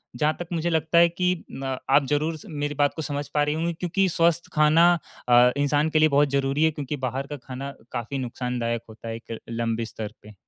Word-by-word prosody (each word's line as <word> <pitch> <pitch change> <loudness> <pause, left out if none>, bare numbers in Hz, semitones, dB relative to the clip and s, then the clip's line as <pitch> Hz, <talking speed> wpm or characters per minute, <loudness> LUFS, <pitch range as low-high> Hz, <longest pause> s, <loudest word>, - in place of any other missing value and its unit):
जहाँ 150 +5 +1
तक 175 - -5
मुझे 170 +1 0
लगता 160 +1 +1
है 170 0 +8
कि 180 +1 +1 0.3
अ, 135 -1 -2
आप 140 - +5
ज़रूर 155 +2 0
स - - -13
मेरी 145 -1 -3
बात 145 0 +2
को 160 - -4
समझ 145 -1 -3
पा 150 - +3
रही 150 +1 0
होंगी 165 +2 -1
क्योंकि 180 +3 0
स्वस्थ 170 0 +1
खाना 155 +3 +5 0.4
अ, 120 +1 +7
इंसान 145 +2 +2
के 155 0 +2
लिए 155 0 +5
बहुत 145 +1 +3
ज़रूरी 140 +2 +1
है। 160 - +4
क्योंकि 145 0 -4
बाहर 135 +3 -4
का 145 0 -6
खाना 135 +2 -5 0.2
काफ़ी 120 +4 -4
नुकसानदायक 120 -2 -2
होता 110 +1 -11
है 115 - -3
एक 115 0 -8
लंबे 115 0 -1
स्तर 110 -1 -7
पे। 105 0 -13
145 Hz, 225 wpm, -25 LUFS, 125-160 Hz, 0.4 s, है